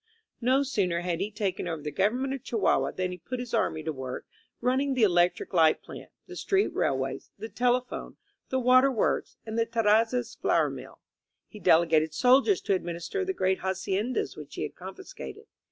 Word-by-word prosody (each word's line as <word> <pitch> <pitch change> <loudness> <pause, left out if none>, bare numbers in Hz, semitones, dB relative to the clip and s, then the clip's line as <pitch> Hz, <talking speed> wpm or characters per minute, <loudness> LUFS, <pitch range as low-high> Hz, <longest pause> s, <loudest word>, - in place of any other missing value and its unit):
No 260 +4 +3
sooner 190 -10 0
had 175 -2 -2
he 200 +2 -1
taken 205 -4 -3
over 165 -3 -4
the 150 - -3
government 245 - 0
of 270 - -5
Chihuahua 225 -5 +1
than 185 -1 -2
he 180 - -7
put 250 +10 -5
his 245 -2 -6
army 155 0 0
to 160 0 -2
work 130 -2 -6 0.3
running 265 +2 +1
the 245 - +2
electric 175 -1 +2
light 160 -3 +4
plant, - - -10 0.2
the - - -10
street 395 0 +1
railways, - - -1
the 220 - -7
telephone, 250 +1 -1 0.3
the 260 - 0
water 255 +2 +5
works 225 - -1
and 220 +1 -3
the 230 - +3
Terrazzas 230 +2 +2
flour - - +1
mill. - - -10 0.5
He 210 - -12
delegated 160 -3 +3
soldiers 265 - +4
to 200 - 0
administer 175 - -3
the 380 0 -2
great 190 - +1
haciendas 190 +5 -2
which - - -10
he - - -3
had - - -5
confiscated. 420 +3 -9
215 Hz, 180 wpm, -28 LUFS, 175-255 Hz, 0.5 s, water